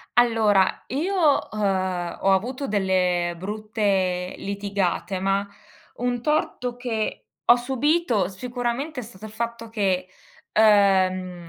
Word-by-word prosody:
Allora, 220 -5 +3
io, 320 +9 -2 0.4
uhm, 185 -4 -1
ho 195 - +3
avuto 255 +8 0
delle 180 -3 +1
brutte 195 -2 -1
litigate, 200 -2 -2
ma 195 +1 0 0.5
un 245 0 -1
torto 260 -5 -1
che 235 -3 -3 0.2
ho 240 - +7
subito 255 - +1
sicuramente 245 - -4
è - - -5
stato 215 -2 -11
il 215 - -9
fatto 230 +1 -4
che, 190 -4 0 0.5
uhm, 185 -4 +3
210 Hz, 110 wpm, -24 LUFS, 190-240 Hz, 0.5 s, ho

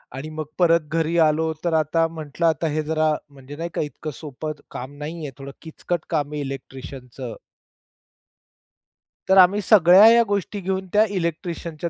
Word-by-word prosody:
आणि 145 +4 -6
मग 155 - -3
परत 165 -3 +3
घरी 165 +1 0
आलो. 160 +1 +1
तर 170 - +1
आता 165 +2 +1
म्हंटलं, 160 0 -4
"आता 160 0 +1
हे 155 0 -1
जरा 155 0 +1 0.2
म्हणजे 140 0 -12
नाही 170 +2 -5
का - - -1
इतकं 150 +1 -6
सोपं 155 +1 -6 0.2
काम 130 +3 -7
नाहीये. 155 -2 -6
थोडं 140 0 -8
किचकट 165 +1 -4
काम 150 -3 -1
आहे 150 - -3
इलेक्ट्रिशियनचं." 130 -2 -8 1.9
तर 190 - +4
आम्ही 190 +3 +6
सगळ्या 190 0 +7
ह्या 235 +1 +7
गोष्टी 205 0 -2
घेऊन 190 0 -3
त्या 215 +1 +5
इलेक्ट्रिशियनच्या 170 -1 -4
160 Hz, 155 wpm, -22 LUFS, 145-175 Hz, 1.9 s, सगळ्या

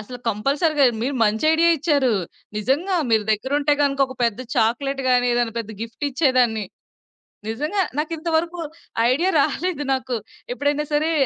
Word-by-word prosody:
అసలు 245 +4 -9
కంపల్సరీగా 280 - +1 0.2
మీరు 275 +4 -1
మంచి 215 +5 0
ఐడియా 335 +1 +4
ఇచ్చారు. 285 -4 +2 0.5
నిజంగా 290 - 0
మీరు 220 -2 +3
దగ్గరుంటే 285 +7 0
గనుక 275 -1 0
ఒక 260 - -9
పెద్ద 230 0 -1
చాక్లేట్ 260 +4 0
గాని, 245 0 +3
ఏదైనా 240 -1 0
పెద్ద 225 -2 -5
గిఫ్ట్ 230 +5 -6
ఇచ్చేదాన్ని. 255 -6 +2 0.8
నిజంగా. 300 - -1 0.2
నాకింత 320 +2 -3
వరకు 340 +2 -2 0.5
ఐడియా 335 +9 +2
రాలేదు 335 0 -1
నాకు. 255 -2 -3 0.4
ఎప్పుడైనా 290 +3 0
సరే 305 +2 +2
275 Hz, 140 wpm, -22 LUFS, 240-305 Hz, 0.8 s, ఐడియా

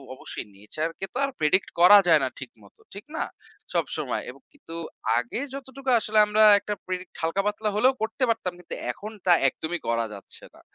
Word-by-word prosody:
অবশ্যই - - -7
nature 155 +11 -4
কে - - -2
তো - - -5
আর 275 - -4
predict 155 +5 +3
করা 205 +4 +10
যায় 160 -3 +6
না 130 - 0
ঠিক 135 -3 -8
মতো। 100 - -21
ঠিক 200 +1 -9
না? - - 0 0.5
সবসময়। - - -2
এবং - - -12
কিন্তু 220 - -12 0.4
আগে 120 - -4
যতটুকু 270 0 -6
আসলে 215 0 +1
আমরা 215 +1 +4 0.2
একটা 210 - -4
predict 185 0 -5
হালকা 165 +4 0
পাতলা 210 +1 -1
হলেও 255 +5 +4
করতে 225 +4 -2
পারতাম, 190 -6 -1
কিন্তু 180 - -7 0.2
এখন 210 - -9
তা 180 - +6
একদমই 160 +5 -3
করা 115 0 +1
যাচ্ছে 100 - -11
না। - - -18
185 Hz, 190 wpm, -25 LUFS, 155-220 Hz, 0.5 s, করা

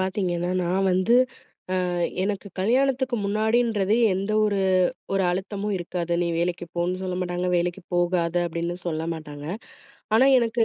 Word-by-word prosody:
பாத்தீங்கன்னா, 180 -2 -1
நான் 190 +2 +1
வந்து 185 +6 +3 0.7
அ - - -1 0.4
எனக்கு 200 0 -2
கல்யாணத்துக்கு 260 +3 +2
முன்னாடின்றதே 215 0 +2 0.2
எந்த 195 +3 -2
ஒரு 200 -2 +1 0.5
ஒரு 195 -1 +2
அழுத்தமும் 200 +2 -3
இருக்காது. 175 0 -3
நீ 175 - +1
வேலக்கிப் 175 0 -2
போன்னு 180 +2 -1
சொல்லமாட்டாங்க, 180 -1 -2
வேலக்கிப் 175 +1 -3
போகாத 175 -1 +1
அப்பிடின்னும் 170 +2 -4
சொல்லமாட்டாங்க. 155 -3 -4 0.7
ஆனா 260 +4 +6
எனக்கு, 230 -1 +1
185 Hz, 125 wpm, -25 LUFS, 175-210 Hz, 0.7 s, ஆனா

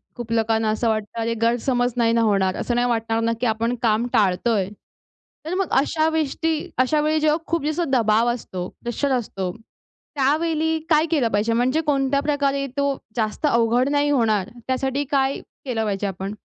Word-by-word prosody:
खूप 240 -2 -7
लोकांना 225 -1 +1
असं 220 +2 0
वाटतं, 215 +1 -2
अरे 230 +1 0
गैरसमज 245 +1 +1
नाही 230 -1 +3
ना 230 - +3
होणार? 195 -4 +2
असं 240 - -1
नाही 245 0 +2
वाटणार 225 -1 0
ना, 230 0 +1
की - - +1
आपण 230 +2 0
काम 225 0 +2
टाळतोय? 200 -1 +2 0.8
तर 335 - -3
मग 390 -1 -1
अशा 315 +2 0
वेस्टी 320 +1 0 0.2
अशा 280 +4 +2
वेळी 310 +1 +1
जेव्हा 305 0 +2
खूप 330 -3 -1
जसं 310 0 -1
दबाव 230 -1 +3
असतो, 185 -6 -6 0.2
प्रेशर 255 +4 -1
असतो, 195 -7 -2 0.6
त्यावेळी 320 +3 +1
काय 310 0 +4
केलं 275 -8 +2
पाहिजे? 215 +3 +1
म्हणजे 255 +7 +1
कोणत्या 280 -2 +1
प्रकारे 280 -1 0
तो 280 -1 +1 0.2
जास्त 220 +6 -1
अवघड 235 +3 +2
नाही 290 0 +2
होणार, 220 -8 +1 0.2
त्यासाठी 265 +2 0
काय 270 -1 +1 0.3
केलं 230 -4 -1
पाहिजे 200 0 -1
आपण? 195 +2 -5
245 Hz, 170 wpm, -22 LUFS, 225-285 Hz, 0.8 s, काय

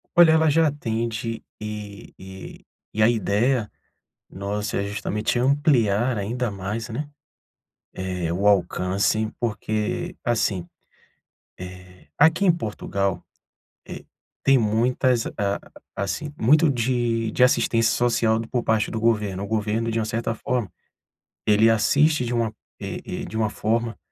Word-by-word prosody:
Olha, 175 -2 +8
ela 160 0 +4
já 160 +2 +4
atende 115 -4 -3 0.2
e 105 -1 -7
e 95 0 -10 0.3
e 110 - -1
a 110 - +6
idéia 115 +1 +1 0.6
nossa 100 +1 -3
é 100 - -1
justamente 105 +3 -2
ampliar 125 -4 +2
ainda 115 +4 -2
mais, 100 +4 -4
né, 140 +6 -4 0.9
eh, 90 -3 -3
o 95 +4 -1
alcance 100 +3 +1
porque, 110 - -2
assim, 105 -7 0 0.9
eh 90 0 -11
aqui 160 +6 +4
em 180 - +7
Portugal, 100 - -2 0.6
eh, - - -8 0.4
tem 135 -1 +5
muitas 120 +2 +1
a 100 -1 -2 0.4
assim, 120 +9 -3
muito 150 +8 +5
de 120 -3 0
de 125 - +3
assistência 115 -2 +3
social 115 -2 +2
por 125 -2 +1
parte 110 -1 +1
do 110 - -3
governo. 105 -4 0
O - - -5
governo, 110 +1 -1
de 115 - -1
uma 110 - 0
certa 115 +1 -2
forma, 115 -4 -2 0.8
ele 105 +1 +5
assiste 140 +6 +3
de 120 - -2
uma 115 -2 0 0.3
e - - -5
e - - -5
de 110 - -6
uma 110 -1 +1
forma 115 +2 -1
110 Hz, 135 wpm, -23 LUFS, 105-120 Hz, 0.9 s, Olha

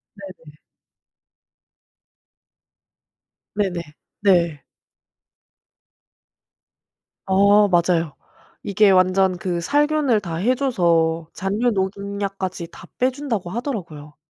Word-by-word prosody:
네네. 185 -7 -13 3.0
네네. 190 -4 -1 0.4
네. 170 -7 +2 2.7
어 200 +2 +5
맞아요. 170 -3 +1 0.5
이게 200 0 +3
완전 185 0 +3
그 175 -1 -3
살균을 290 - +1
다 170 -4 -5
해 220 +10 +1
줘서 170 - +1
잔류농약까지 195 -3 -2
다 - - -13
빼준다고 255 -8 -1
하더라고요. 175 - -6
190 Hz, 155 characters per minute, -21 LUFS, 170-210 Hz, 3.0 s, 어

